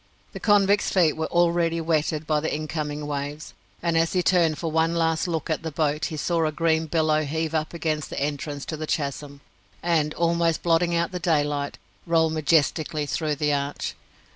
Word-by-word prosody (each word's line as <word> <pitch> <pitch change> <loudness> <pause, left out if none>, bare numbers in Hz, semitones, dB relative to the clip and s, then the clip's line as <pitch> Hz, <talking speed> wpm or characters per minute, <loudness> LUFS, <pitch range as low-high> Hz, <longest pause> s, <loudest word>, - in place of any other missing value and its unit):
The - - -6
convict's 205 -1 +3
feet 170 -5 +3
were 160 0 -2
already 170 -1 +2
wetted 160 -1 0
by 155 -1 +1
the 160 - -2
incoming 150 -1 -3
waves, 145 +1 -5 0.3
and 170 -1 +1
as 165 0 +2
he 180 -1 +2
turned 170 -5 +3
for 165 -2 -3
one 160 +1 +2
last 165 0 +1
look 165 -4 -2
at 155 - -1
the 165 - -4
boat 150 0 0
he 155 - -4
saw 165 +2 0
a - - -1
green 160 0 +1
billow 155 -1 +2
heave 160 +2 -2
up 155 -1 -1
against 155 -3 -2
the - - -4
entrance 145 0 -3
to 155 - -5
the 155 0 -5
chasm, 140 -1 -3 0.4
and, 160 -3 +1
almost 170 -1 +1
blotting 170 0 +2
out 170 0 0
the 180 - -4
daylight, 145 -4 0 0.3
roll 165 -1 +3
majestically 155 0 +1
through 150 +1 -1
the 150 0 0
arch. 140 0 -2
160 Hz, 190 wpm, -25 LUFS, 150-170 Hz, 0.4 s, convict's